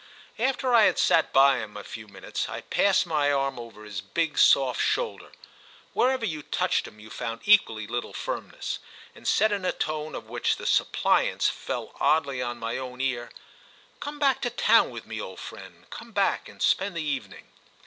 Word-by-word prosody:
After 260 +1 +1
I 225 -3 +7
had - - +3
sat 165 - +3
by 135 -1 +5
him 105 -2 -7
a 105 - -7
few 110 +1 -9
minutes 100 - -5
I - - -5
passed 200 0 +2
my 150 -4 +1
arm 135 -2 0
over 115 -2 -10
his 105 -3 -6
big 150 - -1
soft 130 -2 +5
shoulder—wherever 260 - -2
you 155 -7 -3
touched - - 0
him 105 - -15
you 110 +1 -13
found 115 -2 -5
equally 115 - +4
little 120 +3 -4
firmness—and - - -7
said 215 +1 +3
in 200 -2 -1
a 185 - +1
tone 155 0 -3
of - - -7
which - - 0
the - - -8
suppliance - - +2
fell - - -5
oddly 140 -4 +2
on 120 -1 -3
my 115 +1 -3
own 125 -1 -7
ear: 125 -3 -1 0.7
"Come 290 0 -6
back 275 -3 +2
to 245 - 0
town 240 - +4
with - - -8
me, - - -5
old - - -8
friend—come 235 -1 -11
back 200 -1 +1
and - - -7
spend 195 -2 +1
the 165 - -2
evening." 145 -3 -5
145 Hz, 180 wpm, -26 LUFS, 120-200 Hz, 0.7 s, I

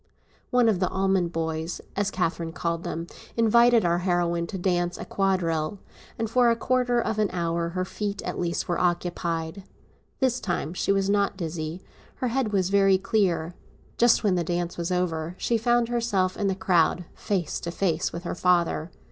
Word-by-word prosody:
One 245 -2 +4
of 210 -5 +2
the 185 - +1
Almond 190 -2 +1
boys, 160 0 -3 0.2
as 205 0 0
Catherine 170 -3 -2
called 170 0 -2
him, 165 +1 -3 0.3
invited 235 -1 +5
our 170 0 +2
heroine 175 -2 0
to 195 - -5
dance 175 -1 0
a - - -6
quadrille, 185 -3 0 0.4
and 225 - -1
for 240 +2 +4
a 230 - +3
quarter 245 0 +1
of 220 -2 -1
an 210 -2 +2
hour 170 -1 -1
her 185 +1 -2
feet 205 0 -4
at - - -4
least 170 -1 -1
were 175 - 0
occupied. 175 0 -1 0.6
This 260 -2 +1
time 175 - -2
she 185 - 0
was 195 -1 +2
not 200 -1 +1
dizzy; 160 0 -4 0.3
her 255 - -2
head 240 -3 0
was 190 -2 +1
very 195 -1 +5
clear. 190 -4 0 0.5
Just 240 0 +5
when 205 -3 +3
the 175 -1 +1
dance 175 +1 -2
was 170 +1 -3
over, 170 -2 -1
she 235 - 0
found 240 +1 +2
herself 210 -6 0
in 200 - -1
the 190 - 0
crowd 180 -3 +2
face 185 -6 -2
to 170 - -5
face 170 -2 0
with 170 - -6
her 170 - -3
father. 175 -2 +1
185 Hz, 180 wpm, -26 LUFS, 170-205 Hz, 0.6 s, invited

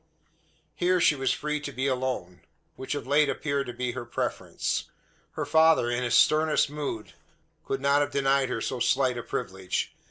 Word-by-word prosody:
Here 180 +1 +2
she 165 - +5
was 135 -1 0
free 150 0 -2
to 145 -1 -6
be 130 0 -3
alone; 125 -9 -2 0.3
which 130 +2 -4
of 145 - -5
late 145 +2 +3
appeared 140 -2 -1
to 120 - -5
be 125 0 -2
her 125 0 -5
preference. 120 - -3 0.5
Her - - -3
father, 160 -6 +4
in 120 +1 -1
his 125 -1 +1
sternest 155 -1 +4
mood, 140 -7 -5 0.5
could 135 0 -2
not 140 +1 +3
have 145 - 0
denied 135 -1 +1
her 115 - -2
so 130 - -3
slight 130 0 +2
a - - -3
privilege. 95 -4 -3
135 Hz, 180 wpm, -27 LUFS, 125-145 Hz, 0.5 s, she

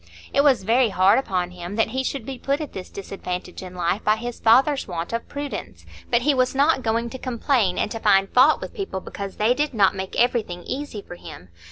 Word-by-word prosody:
It 280 - +4
was 270 -8 +4
very 235 +4 +3
hard 195 +4 +4
upon 180 -8 -2
him 180 +2 -7
that 225 0 +1
he 260 +3 -2
should 265 -3 -3
be 265 -1 -6
put 280 +4 -1
at 305 -3 -6
this 185 - -7
disadvantage 180 -2 -6
in 185 -1 -9
life 180 +4 -1
by 215 - +3
his 240 +2 -6
father's 270 +5 +4
want 175 +1 -5
of 230 - -3
prudence; 265 - -6 0.2
but 235 0 +2
he 295 +2 +3
was 255 0 +1
not 285 0 +3
going 230 0 -1
to 260 - -7
complain 235 -6 0
and - - -1
to 225 - -4
find 195 -3 +4
fault 265 +5 +5
with - - -7
people 390 - -4
because 195 +1 -7
they 220 +3 +3
did 290 0 -1
not 200 -3 +4
make 190 0 -4
everything 220 -8 0
easy 265 -7 -5
for 175 - -10
him. 90 - -11
225 Hz, 225 wpm, -23 LUFS, 190-260 Hz, 0.2 s, fault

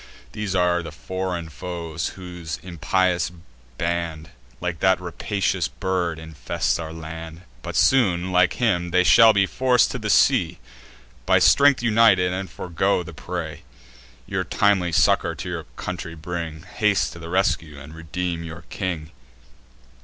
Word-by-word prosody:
These 105 -3 -3
are 90 -1 +2
the 80 - -8
foreign 90 +1 -4
foes, 85 -1 -5
whose 90 -4 -6
impious 90 -1 0 0.5
band, 85 -2 -3 0.3
Like 85 0 -3
that 95 -1 +3
rapacious 95 0 -1
bird, 90 -4 -2
infest 80 0 -2
our 80 -1 -5
land: 80 +1 -8 0.2
But 85 +3 -6
soon, 95 -2 +3
like 90 0 +4
him, 90 -8 0
they 90 +1 +3
shall 115 +4 +7
be 100 -2 +3
forc'd 125 +4 +2
to - - -3
sea - - +3 0.7
By - - +5
strength 140 -3 +5
united, 105 -6 +4
and 95 +1 -4
forego 90 +1 -1
the - - -10
prey. - - -6 0.6
Your - - -2
timely 100 -4 +2
succour - - +3
to - - -7
your - - -4
country 90 -2 -6
bring, 80 -1 -5
Haste 100 +1 0
to 85 - -11
the 85 0 -8
rescue, 85 -5 0
and 75 +3 -11
redeem 85 +1 -4
your 80 0 -8
king." 85 -5 -4
90 Hz, 140 wpm, -23 LUFS, 80-95 Hz, 0.7 s, shall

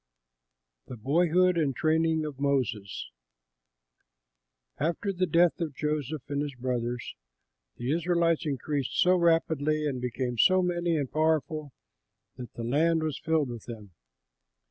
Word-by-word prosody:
THE 125 - -8
BOYHOOD 170 +8 +2
AND 140 -5 0
TRAINING 160 0 +1
OF 145 -3 -7
MOSES 125 -8 -1 1.7
After 170 +6 -1
the 185 0 0
death 170 +2 +3
of 155 -5 -3
Joseph 150 -2 -2
and 145 0 -2
his 145 -2 -4
brothers, 120 -1 -3 0.6
the 120 +3 -2
Israelites 170 0 +1
increased 140 -1 -2
so 180 +1 +5
rapidly 160 -3 +2
and 130 -4 -2
became 125 -1 -3
so 185 -1 +5
many 175 -2 0
and 140 -4 -3
powerful 155 -1 0 0.6
that 125 -1 -9
the 115 - -5
land 160 +7 +2
was 155 -3 -2
filled 160 -4 +1
with 120 -3 -8
them. 110 -5 -9
150 Hz, 130 wpm, -28 LUFS, 130-165 Hz, 1.7 s, so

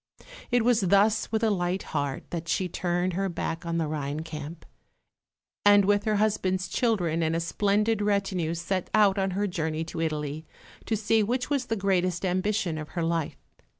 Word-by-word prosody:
It 245 -2 +2
was 240 -3 +4
thus 200 +3 +3
with 220 0 0
a 220 - +3
light 180 -1 -1
heart 145 -3 -2
that 165 -1 -4
she 185 - 0
turned 175 +1 -1
her 195 +2 -1
back 170 -1 -4
on 170 0 -1
the 165 - +1
Rhine 150 0 -3
camp; 155 0 -8 1.0
and 205 -1 +6
with 205 +1 +2
her 215 -1 +2
husband's 190 -3 +1
children 175 -8 0
and 160 0 +1
a - - +1
splendid 205 +5 +1
retinue 195 -5 0
set 175 +2 -2
out 205 -2 +4
on 195 0 +1
her 205 - +1
journey 160 -4 -2
to 165 0 -5
Italy, 150 -1 -2 0.4
to 220 - +1
see 220 +1 +2
which 245 +6 -1
was 270 -3 0
the 225 - 0
greatest 185 -3 0
ambition 185 -2 0
of 155 - -7
her 170 - +1
life. 165 -2 -1
185 Hz, 185 wpm, -27 LUFS, 165-205 Hz, 1.0 s, and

